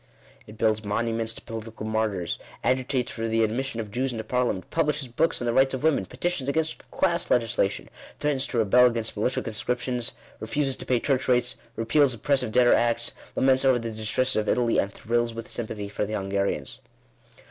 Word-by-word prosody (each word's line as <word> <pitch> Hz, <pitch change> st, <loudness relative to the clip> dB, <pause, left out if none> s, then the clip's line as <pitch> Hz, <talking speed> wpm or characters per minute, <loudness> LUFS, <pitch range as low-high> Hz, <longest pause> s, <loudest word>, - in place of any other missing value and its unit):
It 105 Hz, -, -12 dB
builds 110 Hz, -1 st, +2 dB
monu 115 Hz, +2 st, -1 dB
ments 115 Hz, 0 st, -1 dB
to -, -, -10 dB
political 110 Hz, -1 st, -7 dB
martyrs, 110 Hz, -6 st, -1 dB, 0.2 s
agitates 130 Hz, 0 st, 0 dB
for 115 Hz, 0 st, -3 dB
the 115 Hz, 0 st, +2 dB
admission 120 Hz, +2 st, -1 dB
of 105 Hz, -2 st, -5 dB
Jews 130 Hz, +4 st, -1 dB
into 110 Hz, -2 st, -4 dB
Parliament, 120 Hz, -6 st, -1 dB
publishes 150 Hz, -4 st, 0 dB
books 155 Hz, +8 st, +1 dB
on 120 Hz, -, -3 dB
the 120 Hz, -, +1 dB
rights 135 Hz, +1 st, +4 dB
of 130 Hz, -, -6 dB
women, 145 Hz, -12 st, +2 dB
petitions 175 Hz, -6 st, -2 dB
against 160 Hz, +2 st, -2 dB
class 170 Hz, -2 st, 0 dB
legislation, 115 Hz, -4 st, +1 dB, 0.3 s
threatens 145 Hz, -3 st, 0 dB
to 125 Hz, -, -3 dB
rebel 120 Hz, +3 st, +6 dB
against 115 Hz, -2 st, -2 dB
militia 115 Hz, +4 st, 0 dB
conscriptions, 120 Hz, +2 st, -2 dB, 0.3 s
refuses 135 Hz, +4 st, -1 dB
to -, -, -9 dB
pay 125 Hz, -2 st, +3 dB
church 130 Hz, +1 st, 0 dB
rates, 125 Hz, -1 st, +2 dB, 0.2 s
repeals 130 Hz, +3 st, +3 dB
op 110 Hz, -, -17 dB
pressive 130 Hz, -5 st, +3 dB
debtor 120 Hz, +1 st, +5 dB
acts, 120 Hz, 0 st, +2 dB, 0.2 s
laments 130 Hz, 0 st, +3 dB
over 130 Hz, -2 st, +5 dB
the 115 Hz, -1 st, -4 dB
distresses 110 Hz, +4 st, 0 dB
of 110 Hz, 0 st, 0 dB
Italy, 120 Hz, -2 st, +2 dB
and 100 Hz, -, 0 dB
thrills 120 Hz, +2 st, -1 dB
with 115 Hz, 0 st, -6 dB
sympathy 110 Hz, -3 st, -5 dB
for 105 Hz, -, -3 dB
the 105 Hz, +1 st, -3 dB
Hungarians. 100 Hz, -7 st, -2 dB
120 Hz, 190 wpm, -26 LUFS, 110-130 Hz, 0.3 s, rebel